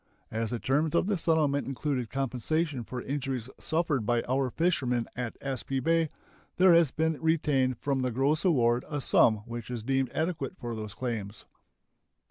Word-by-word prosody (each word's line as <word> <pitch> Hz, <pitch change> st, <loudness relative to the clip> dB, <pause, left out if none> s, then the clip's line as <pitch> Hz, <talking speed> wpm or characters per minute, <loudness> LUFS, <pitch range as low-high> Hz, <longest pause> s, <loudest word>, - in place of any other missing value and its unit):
As 110 Hz, 0 st, -1 dB
the 120 Hz, -, -2 dB
terms 150 Hz, +7 st, +1 dB
of -, -, +3 dB
the 205 Hz, +1 st, +1 dB
settlement 155 Hz, -5 st, +1 dB
included 135 Hz, -3 st, -2 dB
compensation 135 Hz, +2 st, -1 dB
for 125 Hz, +2 st, -6 dB
injuries 135 Hz, -3 st, -3 dB
suffered 160 Hz, -6 st, 0 dB
by 120 Hz, +2 st, +1 dB
our 130 Hz, +1 st, +1 dB
fishermen 125 Hz, -7 st, 0 dB
at 120 Hz, -2 st, -4 dB
Aspee 135 Hz, 0 st, -2 dB
Bay, 165 Hz, +3 st, +2 dB, 0.5 s
there 185 Hz, -1 st, +7 dB
has 165 Hz, -3 st, +5 dB
been 160 Hz, +2 st, -1 dB
retained 145 Hz, -6 st, +2 dB
from 140 Hz, +1 st, -1 dB
the 130 Hz, -1 st, 0 dB
gross 135 Hz, +6 st, +1 dB
award 120 Hz, -9 st, +3 dB
a 145 Hz, -, -2 dB
sum 110 Hz, -5 st, +4 dB
which 120 Hz, -1 st, -7 dB
is 120 Hz, -3 st, -4 dB
deemed 135 Hz, +1 st, +1 dB
adequate 160 Hz, -5 st, -2 dB
for 120 Hz, -1 st, -5 dB
those 110 Hz, -2 st, -6 dB
claims. 115 Hz, -5 st, -4 dB
135 Hz, 165 wpm, -29 LUFS, 120-155 Hz, 0.5 s, there